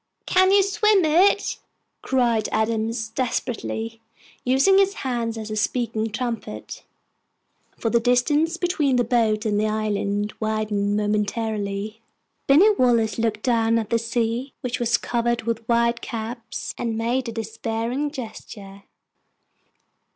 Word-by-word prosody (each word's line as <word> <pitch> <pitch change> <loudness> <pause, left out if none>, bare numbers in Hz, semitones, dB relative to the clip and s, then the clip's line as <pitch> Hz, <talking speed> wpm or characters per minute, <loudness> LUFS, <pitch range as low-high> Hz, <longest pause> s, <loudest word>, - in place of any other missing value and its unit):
"Can 375 +1 +4
you 400 0 +6
swim 400 -1 +3
it?" 365 +6 +3 0.4
cried 235 -4 +1
Adams, 220 +1 -1
desperately, 230 -2 -3 0.4
using 270 +10 +4
his 395 0 +2
hand 235 -3 -2
as 220 -1 -6
a - - -2
speaking 225 0 -1
trumpet, 235 +1 -5 0.9
for 225 - -1
the 235 - +4
distance 290 +8 +2
between 325 -7 +1
the 245 - +3
boat 225 -2 +1
and 210 -1 +1
the 215 - +1
island 210 -1 -1
widened 215 -2 0
momentarily. 210 0 -2 0.5
Binny 340 +11 +6
Wallace 235 - +2
looked 220 -2 -1
down 230 -2 +2
at 220 -2 -3
the 230 - +3
sea, 230 +3 -2
which 250 -1 -3
was 240 0 +2
covered 235 -1 -1
with 230 0 -3
white 235 0 +2
caps, 230 0 -5
and 230 -2 -2
made 240 +2 -1
a - - -4
despairing 225 +4 -3
gesture. 205 -7 -9
230 Hz, 130 wpm, -23 LUFS, 220-250 Hz, 0.9 s, you